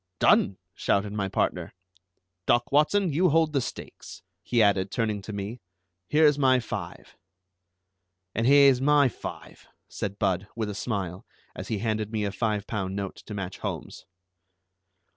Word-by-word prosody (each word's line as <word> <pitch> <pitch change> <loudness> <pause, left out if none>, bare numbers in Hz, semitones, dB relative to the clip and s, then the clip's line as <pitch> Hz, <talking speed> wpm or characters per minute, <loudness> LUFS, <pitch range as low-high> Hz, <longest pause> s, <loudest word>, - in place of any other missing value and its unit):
"Done!" 95 +3 +4 0.2
shouted 100 +1 0
my 100 -2 -2
partner. 90 -3 -1 0.7
"Doc 120 0 +2
Watson, 155 +5 +3
you 180 +5 +3
hold 160 0 +2
the 140 - +2
stakes," - - -8 0.2
he 120 - 0
added, 100 -3 +3
turning 105 -1 -1
to 100 - -8
me; 100 +3 -5 0.5
"here's 150 -1 +4
my 130 -2 +4
five." 120 - -7 1.2
"And 115 +2 0
here's 140 -2 +6
my 145 -1 +4
five," - - -9 0.2
said 100 0 -5
Budd, 95 -1 0
with 110 -2 -2
a - - -6
smile, 100 -4 -4 0.3
as - - -7
he 110 - -2
handed 110 0 -2
me 110 -2 -1
a 100 - -2
five 105 -1 -1
pound 95 -4 -3
note 100 -1 -4
to 105 - -6
match 95 -2 -5
Holmes's. - - -6
110 Hz, 150 wpm, -26 LUFS, 100-135 Hz, 1.2 s, here's